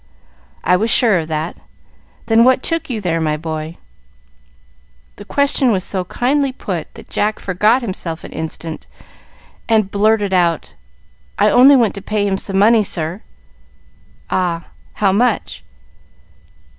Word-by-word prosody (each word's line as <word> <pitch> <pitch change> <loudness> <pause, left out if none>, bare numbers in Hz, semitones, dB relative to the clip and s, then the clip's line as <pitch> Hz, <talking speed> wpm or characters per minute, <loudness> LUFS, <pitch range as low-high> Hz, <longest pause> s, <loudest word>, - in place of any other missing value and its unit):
"I 180 - +3
was 220 +4 -1
sure 220 -6 +5
of 160 - -5
that. 160 +1 -4 0.7
Then 225 0 +4
what 255 +1 +3
took 330 -3 -2
you 235 -4 -2
there, 170 -4 -1
my 155 -1 0
boy?" 160 0 -6 1.4
The - - -11
question 280 -3 +2
was 190 -4 +1
so 185 -2 -2
kindly 270 +7 0
put 185 -10 -5
that - - -12
Jack 210 +1 -1
forgot 210 +7 +1
himself 175 -6 -5
an - - -10
instant, 160 0 -6 0.8
and 215 -3 +2
blurted 205 -1 +1
out, 170 -3 0 0.6
"I - - +3
only 270 +3 +7
went 235 -5 +2
to 200 - -8
pay 210 +1 -1
him 195 -1 -1
some 195 -1 -3
money, 215 +2 +5
sir." 170 +1 -2 1.1
"Ah, 170 -2 -1 0.2
how 200 -2 +1
much?" 230 +3 0
200 Hz, 140 wpm, -17 LUFS, 170-230 Hz, 1.4 s, only